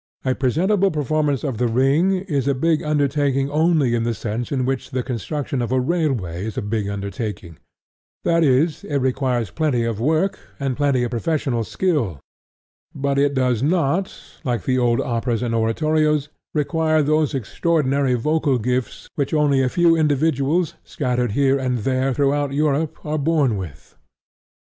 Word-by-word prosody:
A 130 - +2
presentable 180 +10 +2
performance 150 -3 0
of 130 -7 -3
The 125 - +2
Ring 135 +10 +2
is 145 -9 -2
a 140 - +2
big 160 +3 +1
undertaking 145 -2 0
only 155 -5 +2
in 120 - +1
the 115 0 -1
sense 115 +2 -4
in 130 -3 0
which 135 -1 -2
the 130 -2 -2
construction 130 +3 -3
of 120 - -3
a 130 - +2
railway 125 - -1
is 110 -1 -5
a - - -1
big 105 0 -2
undertaking: 100 -3 -5 0.6
that 170 0 +3
is, 145 +3 +2
it 145 - -4
requires 130 -4 0
plenty 145 -7 0
of 115 -2 -2
work 160 +9 +1 0.2
and 135 -2 -1
plenty 140 -3 +1
of 120 - -2
professional 125 -2 -1
skill; 125 - -1 0.8
but 140 0 0
it 140 0 +2
does 125 -3 +1
not, 170 +4 +1 0.3
like 120 -5 -1
the 130 -1 +1
old 120 -1 +2
operas 120 0 -1
and 120 -1 -1
oratorios, 150 +6 +1 0.3
require 155 +1 +1
those 155 -1 +1
extraordinary 140 0 0
vocal 145 +1 +1
gifts 125 +1 -2
which 145 +1 -1
only 145 -3 +3
a 130 - +1
few 170 +3 +3
individuals 155 +1 +1
scattered 125 -5 -1
here 140 +1 +2
and 130 -2 -1
there 130 +4 0
throughout 145 +1 +1
Europe 150 +1 0
are 155 0 -1
born 145 -5 +2
with. 90 -7 -8
135 Hz, 160 wpm, -21 LUFS, 125-155 Hz, 0.8 s, that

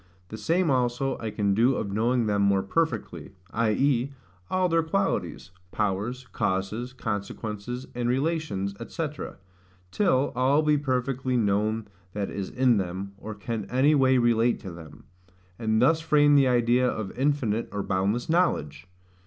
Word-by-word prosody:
The 110 - -7
same 165 - +1
also 125 +1 0
I 110 - -3
can 100 -2 0
do 120 +6 +3
of 100 -4 -3
knowing 115 +3 +1
them 105 -1 +1
more 100 -1 +3
perfectly; 160 - -2 0.2
i.e. 120 +4 +1 0.4
all 185 0 +2
their 165 -1 +2
qualities, 180 - -2 0.2
powers, 105 +6 -2
causes, 100 +6 -2
consequences, 110 +1 -5
and 120 0 -1
relations, 135 - -1
&c., 165 -2 -2 0.8
till 145 -10 +2
all 135 +5 +3
be 150 -1 +3
perfectly 130 -1 -1
known 105 0 0 0.3
that 100 -1 -3
is 100 -2 -4
in 125 -3 +3
them, 95 +1 -3
or 110 0 -7
can 105 0 -4
any 135 +4 +3
way 130 -2 +4
relate 120 0 +2
to 95 - -7
them: 85 -2 -12 0.6
and 110 -1 +1
thus 160 +7 +4
frame 145 -2 +4
the 140 -2 +5
idea 125 0 +3
of 110 -5 -4
infinite 130 -5 0
or 100 -1 -3
boundless 100 +6 0
knowledge. 90 - 0
120 Hz, 145 wpm, -26 LUFS, 105-135 Hz, 0.8 s, the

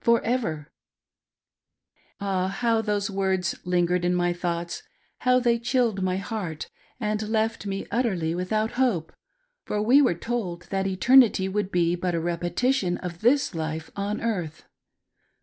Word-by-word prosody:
For 235 0 +4
ever! 165 -12 -1 1.5
Ah! 190 -2 0
how 225 +3 +1
those 205 -2 -1
words 190 -2 0
lingered 180 0 +1
in 175 0 +2
wiy 175 0 +1
thoughts; 170 -1 -3 0.4
how 250 0 +3
they 235 -1 +2
chilled 235 -4 +1
my 185 0 0
heart, 195 -7 -5 0.3
and 215 -1 -2
left 220 -1 0
me 195 0 -3
utterly 190 -10 0
without 215 +5 -1
hope 185 -11 +1
i; - - -34 0.5
for 210 - -1
we 245 +7 +5
;were 250 -11 +3
told 180 -3 -3
that 195 0 0
eternity 210 +1 +5
would 200 0 -2
be 175 -1 +2
but 180 0 -2
a - - 0
repetition 175 +5 0
of 175 -2 -7
this 260 +3 +3
life 160 -1 -4
on 205 +1 -2
earth. 180 -9 -3
195 Hz, 150 wpm, -25 LUFS, 175-225 Hz, 1.5 s, we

